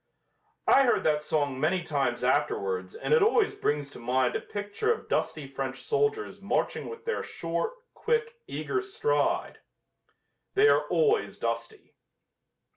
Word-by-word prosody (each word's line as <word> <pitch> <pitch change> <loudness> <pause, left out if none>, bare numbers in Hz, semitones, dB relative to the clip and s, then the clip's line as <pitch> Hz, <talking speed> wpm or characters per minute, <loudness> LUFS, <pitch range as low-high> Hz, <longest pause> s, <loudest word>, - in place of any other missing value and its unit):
I 275 - +6
heard 240 - +2
that 150 -1 +2
song 145 -3 -1
many 170 +5 +1
times 145 -4 -1
afterwards 95 -1 0
and - - -1
it 470 - +6
always 435 0 +3
brings 145 - -1
to - - -11
mind 125 +1 +1
a - - -1
picture 205 - -2
of 455 - -3
dusty - - -1
French - - -4
soldiers 430 -1 0
marching - - -1
with 455 0 -9
their 460 - -1
short, 170 - -3 0.2
quick, 465 0 -1
eager 400 - -2
stride. 450 +4 0 1.0
They 415 +2 +6
are - - +3
always 445 -2 +2
dusty. 435 - -4
275 Hz, 140 wpm, -28 LUFS, -, 1.0 s, I